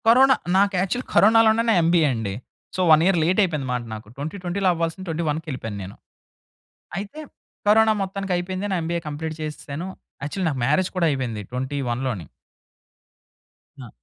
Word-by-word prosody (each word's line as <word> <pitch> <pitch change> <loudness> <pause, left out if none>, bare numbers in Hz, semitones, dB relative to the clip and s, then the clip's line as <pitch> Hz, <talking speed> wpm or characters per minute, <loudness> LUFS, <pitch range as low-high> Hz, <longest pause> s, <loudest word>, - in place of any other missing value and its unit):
Corona 260 +3 +7 0.2
నాకు 200 +1 +3
actual 195 +7 -1
కరోనాలోనే 225 +1 +5
నా - - +5
MBA 165 -2 +4
అండి. 110 -4 -3 0.4
So, 185 - 0
1 155 0 +7
year 190 -1 +3
late 180 +5 +2
అయిపోయిందన్నమాట. 135 -8 -2
నాకు 110 0 -8
2020 180 +6 -2
అవ్వాల్సింది 165 +2 -3
2021 160 -2 -1
కెలిపోయాను 110 -7 -5
నేను. 95 +2 -9 1.0
అయితే 205 +10 -7 0.5
కరోనా 220 +1 +6
మొత్తానికైపోయింది. 190 0 -2
నా - - +1
ఎంబీఏ 170 +1 -2
కంప్లీట్ 155 +2 -4
చేసేసాను. 155 +2 -5 0.4
యాక్చువల్ 180 +5 -2
నాకు 135 -4 -2
మ్యారేజ్ 150 +8 +2
కూడా 175 -2 +2
అయిపోయింది. 125 -6 -2
2021 130 -1 -2
లోనే. 100 - -4 1.5
ఆ! 125 -3 -9
165 Hz, 140 wpm, -23 LUFS, 140-195 Hz, 1.5 s, కరోనా